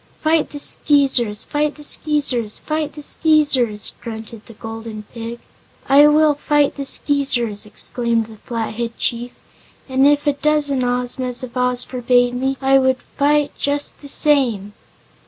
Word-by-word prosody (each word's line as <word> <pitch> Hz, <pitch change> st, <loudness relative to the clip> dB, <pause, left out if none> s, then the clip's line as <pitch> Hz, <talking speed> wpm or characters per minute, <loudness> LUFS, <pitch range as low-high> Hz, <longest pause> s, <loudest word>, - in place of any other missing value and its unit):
"Fight 315 Hz, 0 st, +1 dB
the 290 Hz, -, -9 dB
Skeezers, 270 Hz, -7 st, +1 dB
fight 295 Hz, 0 st, -2 dB
the 295 Hz, -, -13 dB
Skeezers, 280 Hz, -8 st, +1 dB
fight 310 Hz, -1 st, -3 dB
the 295 Hz, 0 st, -7 dB
Skeezers!" 275 Hz, -10 st, +2 dB
grunted 220 Hz, -1 st, -9 dB
the 230 Hz, -, -12 dB
Golden 225 Hz, -1 st, -8 dB
Pig. 230 Hz, 0 st, -7 dB, 0.5 s
"I 285 Hz, +2 st, +6 dB
will 300 Hz, 0 st, +4 dB
fight 290 Hz, 0 st, 0 dB
the 280 Hz, -, -5 dB
Skeezers," 245 Hz, -8 st, +1 dB
exclaimed 230 Hz, +1 st, -2 dB
the 220 Hz, 0 st, -14 dB
Flathead 230 Hz, +1 st, -5 dB
chief, 240 Hz, +1 st, -3 dB, 0.5 s
"and 265 Hz, +1 st, +3 dB
if 290 Hz, 0 st, +2 dB
a 290 Hz, -, +2 dB
dozen 290 Hz, -2 st, +1 dB
Ozmas 250 Hz, +1 st, -2 dB
of 250 Hz, -1 st, -8 dB
Oz 250 Hz, 0 st, 0 dB
forbade 245 Hz, -1 st, +1 dB
me 265 Hz, +2 st, -2 dB
I 270 Hz, 0 st, +4 dB
would 260 Hz, -1 st, +1 dB
fight 290 Hz, +3 st, 0 dB
just 285 Hz, 0 st, -2 dB
the 285 Hz, -, -8 dB
same." 245 Hz, -10 st, +2 dB
260 Hz, 145 wpm, -19 LUFS, 235-290 Hz, 0.5 s, I